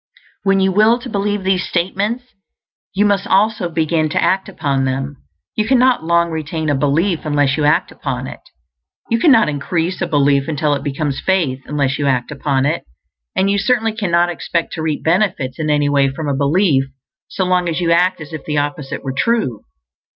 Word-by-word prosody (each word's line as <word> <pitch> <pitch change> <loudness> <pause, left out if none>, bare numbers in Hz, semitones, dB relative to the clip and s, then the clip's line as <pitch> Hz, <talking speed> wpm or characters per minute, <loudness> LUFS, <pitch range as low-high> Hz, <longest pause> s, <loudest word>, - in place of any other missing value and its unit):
_ - - -26 0.2
When 195 -1 +2
you 190 0 +2
will 215 +4 +4
to 245 0 -9
believe 205 0 -1
these 190 -1 +1
statements, 200 +7 -1 0.7
you 205 +2 +1
must 200 -2 +1
also 205 -2 +2
begin 160 -1 0
to - - 0
act 190 +1 +1
upon 140 -7 -1
them. 135 +2 -3 0.4
You 215 0 0
cannot 255 -4 +3
long 170 0 +2
retain 160 0 -2
a - - +1
belief 155 +6 +1
unless 145 -2 +1
you 150 - 0
act 160 +5 +2
upon 130 -2 -4
it; - - -8 0.7
you 230 - +2
cannot 255 -6 +5
increase 165 +5 -2
a 175 - 0
belief 140 -3 +2
until 150 -1 0
it 140 -1 -3
becomes 145 -1 -2
faith 165 -9 +1
unless 140 -2 -1
you 145 - 0
act 125 -1 0
upon 140 -2 0
it; 155 +4 -1 0.5
and 195 +1 +2
you 200 - +1
certainly 225 +1 +1
cannot 175 -5 +1
expect 170 0 -3
to 160 - -4
reap 155 -2 -2
benefits 165 -7 0
in 155 -1 -1
any 145 -1 +2
way 140 -1 +3
from 145 +3 -5
a 140 - 0
belief 140 0 +2 0.4
so 190 - -2
long 180 -1 +1
as 165 - -2
you 170 -1 +1
act 180 +2 +3
as 155 0 -10
if 155 - -6
the 150 -1 -2
opposite 145 -1 -3
were 135 -1 -3
true. 175 - 0
165 Hz, 195 wpm, -17 LUFS, 145-195 Hz, 0.7 s, cannot